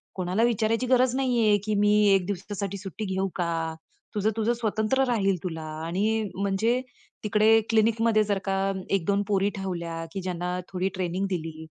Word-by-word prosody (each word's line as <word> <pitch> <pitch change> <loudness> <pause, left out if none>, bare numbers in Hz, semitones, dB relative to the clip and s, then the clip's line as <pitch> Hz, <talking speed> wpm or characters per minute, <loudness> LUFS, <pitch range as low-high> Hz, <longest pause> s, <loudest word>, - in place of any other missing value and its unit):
कोणाला 185 +4 0
विचारायची 230 +1 +1
गरज 255 0 +3
नाहीये 235 -6 +3
की 215 -1 0
"मी 205 0 +4 0.2
1 190 -2 +2
दिवसासाठी 200 0 -4
सुट्टी 195 +2 -6
घेऊ 190 +1 0
का?" 165 -2 -2 0.4
तुझं, 210 +1 +2
तुझं 225 +2 +2
स्वतंत्र 230 +3 0
राहील 195 -6 +1
तुला 160 -3 -4 0.2
आणि 215 +6 0
म्हणजे 200 +6 +1 0.4
तिकडे 215 +1 +4
क्लिनिकमध्ये 225 0 +3
जर 200 -1 0
का 195 0 0 0.3
1-2 200 +2 +1
पोरी 200 0 +2
ठेवल्या 170 -3 -4
की 195 - -3
ज्यांना 180 0 -3
थोडी 185 +1 -1
ट्रेनिंग 185 +1 -1
दिली, 160 -3 -4
200 Hz, 155 wpm, -26 LUFS, 180-220 Hz, 0.4 s, मी